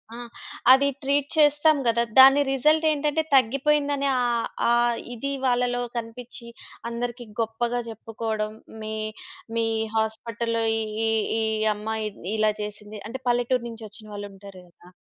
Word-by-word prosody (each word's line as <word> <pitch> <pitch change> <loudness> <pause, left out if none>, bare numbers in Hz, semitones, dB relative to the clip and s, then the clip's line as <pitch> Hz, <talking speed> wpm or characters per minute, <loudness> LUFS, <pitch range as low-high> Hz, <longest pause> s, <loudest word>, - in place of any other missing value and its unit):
ఆ! - - -8 0.5
అది 270 +2 +6
ట్రీట్ 280 0 +1
చేస్తాం 295 +1 +5
గదా. 235 0 +3 0.2
దాని 270 +2 +9
రిజల్ట్ 305 +4 +3
ఏంటంటే 300 +1 0
తగ్గిపోయిందనె 280 +3 +2
ఆహ్, 240 -1 0 0.2
ఆ - - +4 0.4
ఇది 275 +4 -4
వాళ్ళలో 245 -1 +1 0.2
కనిపిచ్చి, 235 +1 -7 0.4
అందరికి 240 +1 -4
గొప్పగా 235 +2 -1
జెప్పుకోవడం. 220 -1 -4 0.3
మీ 215 0 -4 0.6
మీ 230 - +2 0.3
హాస్పిటల్‌లో 230 +1 -1 0.2
ఈ - - -1 0.3
ఈ - - +2 0.3
ఈ - - +1 0.3
అమ్మాయి 220 +1 -3 0.3
ఇలా 215 0 +3
చేసింది. 210 0 -7
అంటే 250 +4 -6
పల్లెటూరు 245 0 +1
నుంచి 225 -1 -9
ఒచ్చిన 215 +1 -7
వాళ్ళుంటారు 200 -2 -9
గదా! 175 +1 -20
235 Hz, 130 wpm, -25 LUFS, 220-270 Hz, 0.6 s, దాని